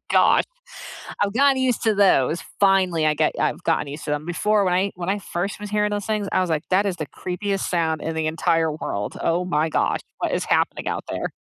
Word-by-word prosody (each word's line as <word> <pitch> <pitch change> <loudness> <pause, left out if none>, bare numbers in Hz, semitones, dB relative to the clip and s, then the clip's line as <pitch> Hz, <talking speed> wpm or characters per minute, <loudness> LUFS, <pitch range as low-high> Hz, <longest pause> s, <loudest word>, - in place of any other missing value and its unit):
Gosh. - - +4 0.8
I've 200 -1 +1
gotten 275 +2 +4
used 255 -3 +1
to 220 -2 +2
those. 175 -5 +3 0.2
Finally, 185 -5 +3
I 150 - +3
get - - +1
I've - - 0
gotten 145 - 0
used 145 +2 -7
to - - -3
them. 150 +1 -1
Before, 205 +4 +1
when 180 -1 +1
I 195 +2 +1
when 175 0 -5
I 205 +1 +1
first 195 +2 -4
was 210 0 -6
hearing 210 0 +1
those 205 -1 -3
things, 210 -2 -1
I - - +3
was 180 - -1
like, 155 0 0
"That 195 +2 +3
is 185 -3 -1
the 155 - -4
creepiest 195 +6 -3
sound 160 -3 0
in 160 - -3
the 160 -1 -1
entire 160 0 +1
world. 105 -9 -4
Oh 175 +2 +1
my 160 -2 0
gosh, - - 0 0.2
what - - -2
is - - 0
happening - - 0
out - - -3
there?" - - -3
180 Hz, 230 wpm, -23 LUFS, 160-205 Hz, 0.8 s, Gosh